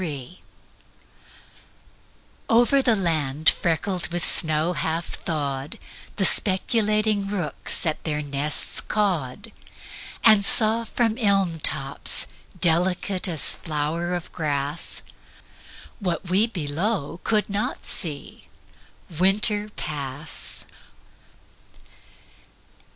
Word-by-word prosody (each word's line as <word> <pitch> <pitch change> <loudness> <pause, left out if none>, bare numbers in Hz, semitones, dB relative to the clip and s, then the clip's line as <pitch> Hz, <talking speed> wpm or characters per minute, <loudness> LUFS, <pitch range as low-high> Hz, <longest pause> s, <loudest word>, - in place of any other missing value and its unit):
THAW 145 -8 -4 2.2
OVER 240 +4 +4
the 240 -4 +3
land 155 -5 +2
freckled 175 +2 -2
with 175 -1 -3
snow 160 +1 +1
half 165 0 -3
thawed 140 -3 -4 0.4
The 195 - +2
speculating 210 +1 +3
rooks 180 -4 -1
at 155 -2 -1
their 150 -2 -2
nests 145 +1 -1
cawed 200 - -2 0.7
And 215 -3 +6
saw 225 +2 +4
from 225 +1 -1
elm 195 -6 +1
tops, 140 -2 +1 0.3
delicate 180 +3 +2
as 165 -5 +2
flower 165 +3 -3
of 175 - -7
grass, 145 0 -3 1.0
What 180 -2 -4
we 205 +5 +4
below 175 -1 -3
could 215 -2 0
not 205 +1 -3
see, 150 -5 -2 0.7
Winter 205 +2 +3
pass. 145 -5 -4
175 Hz, 90 wpm, -23 LUFS, 150-205 Hz, 2.2 s, And